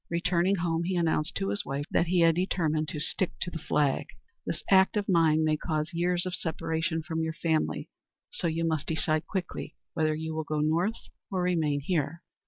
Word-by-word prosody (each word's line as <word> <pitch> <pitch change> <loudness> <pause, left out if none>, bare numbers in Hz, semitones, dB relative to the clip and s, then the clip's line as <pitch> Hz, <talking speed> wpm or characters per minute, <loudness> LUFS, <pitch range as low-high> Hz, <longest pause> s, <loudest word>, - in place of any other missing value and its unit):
Returning 175 +2 +2
home, 170 -2 0
he 185 +1 -1
announced 165 -2 +1
to 95 - -1
his 100 - -1
wife 140 +1 -3
that 170 - +2
he 180 0 +3
had 165 0 +6
determined 160 -3 0
to 150 - -4
"stick 180 +4 -1
to 175 - -2
the 165 - -5
flag." 145 -2 +1 0.4
"This - - -3
act 190 +2 +5
of 205 - -1
mine 160 -4 +4
may 155 -1 +2
cause 155 +1 -2
years 175 +1 +1
of 185 - -3
separation 160 -1 -1
from 160 0 -2
your 160 0 -1
family; 160 -1 0 0.4
so - - -1
you 165 +1 0
must 155 -3 -1
decide 155 0 0
quickly 185 -2 -4 0.2
whether 155 -1 +1
you 160 +1 -4
will 160 0 -2
go 155 0 -2
North 165 +8 +1 0.3
or 185 -2 -1
remain 160 -5 +1
here." 160 +1 -1
165 Hz, 195 wpm, -29 LUFS, 155-175 Hz, 0.4 s, had